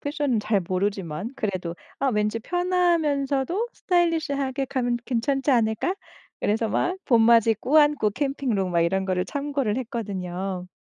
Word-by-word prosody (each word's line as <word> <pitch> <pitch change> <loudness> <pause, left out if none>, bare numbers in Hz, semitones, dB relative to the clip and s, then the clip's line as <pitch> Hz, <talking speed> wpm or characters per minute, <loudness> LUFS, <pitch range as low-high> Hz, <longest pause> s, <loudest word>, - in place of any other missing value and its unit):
패션은 285 -6 -1
잘 210 -2 +1
모르지만 185 +1 -2
그래도 185 -5 -3 0.2
아 275 - 0
왠지 210 -1 0
편하면서도 340 - 0
스타일리시하게 295 -7 0
가면 245 -3 -1
괜찮지 270 +3 0
않을까 230 - +1 0.5
그래서 220 +2 0
막 360 - 0
봄맞이 230 -2 +5
꾸안꾸 295 -2 +3
캠핑룩 260 -7 -1
막 170 - +2
이런 190 +3 +1
거를 180 -1 0
참고를 280 -6 -2
했거든요. 190 -6 -4
240 Hz, 330 characters per minute, -25 LUFS, 205-285 Hz, 0.5 s, 봄맞이